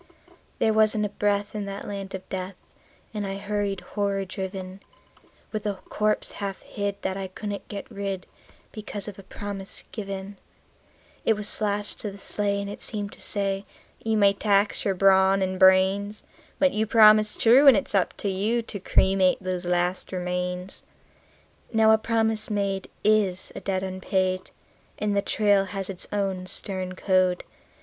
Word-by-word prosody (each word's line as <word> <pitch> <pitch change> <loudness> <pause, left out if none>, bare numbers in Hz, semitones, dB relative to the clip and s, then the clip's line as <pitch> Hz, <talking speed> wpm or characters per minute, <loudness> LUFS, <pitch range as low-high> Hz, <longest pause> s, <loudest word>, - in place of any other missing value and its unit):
There 220 - +2
wasn't 215 -1 +4
a - - -2
breath 205 0 0
in 210 -1 -3
that 200 0 -6
land 195 -1 -5
of 190 - -9
death, 185 0 -5 0.6
and 210 -2 -3
I 195 - -3
hurried, 200 -1 -2
horror 200 -1 -2
driven, 190 -1 -6 0.7
With 215 -1 -3
a 205 - -1
corpse 210 +3 -1
half 195 -2 -5
hid 200 -1 -3
that 190 0 -1
I 195 -1 -4
couldn't 205 +2 -6
get 200 -1 -6
rid, 195 -2 -4 0.5
because 210 -2 -6
of 200 -2 -8
a - - -7
promise 195 0 -6
given; 195 -1 -6 0.9
It 225 - +4
was 210 +1 -1
lashed 205 0 -1
to 210 - -3
the 200 - -10
sleigh, 200 0 0
and 200 - -4
it 205 - -7
seemed 205 -2 -3
to - - -14
say: 195 -1 -2 0.4
"You 225 -1 +1
may 200 -1 +5
tax 200 0 +1
your 195 -2 +1
brawn 190 0 +5
and 185 0 -2
brains, 190 +2 +4 0.3
But 280 -2 +3
you 220 +1 0
promised 215 -1 +6
true, 255 +5 +6
and 260 -6 +9
it's 195 - -3
up 195 -3 +1
to - - 0
you 210 +5 0
to 210 -2 -7
cremate 190 0 +3
those 185 -1 -3
last 180 +1 0
remains." 180 0 -3 0.9
Now 220 -1 +5
a 220 - +5
promise 220 -1 0
made 200 -2 -1
is 205 -4 +2
a - - -6
debt 190 -1 -2
unpaid, 185 0 -1 0.5
and 210 -1 0
the 200 - +3
trail 205 -1 +2
has 195 0 -4
its 180 - -7
own 195 -3 -1
stern 185 0 0
code. 185 -1 +2
200 Hz, 165 wpm, -26 LUFS, 190-210 Hz, 0.9 s, and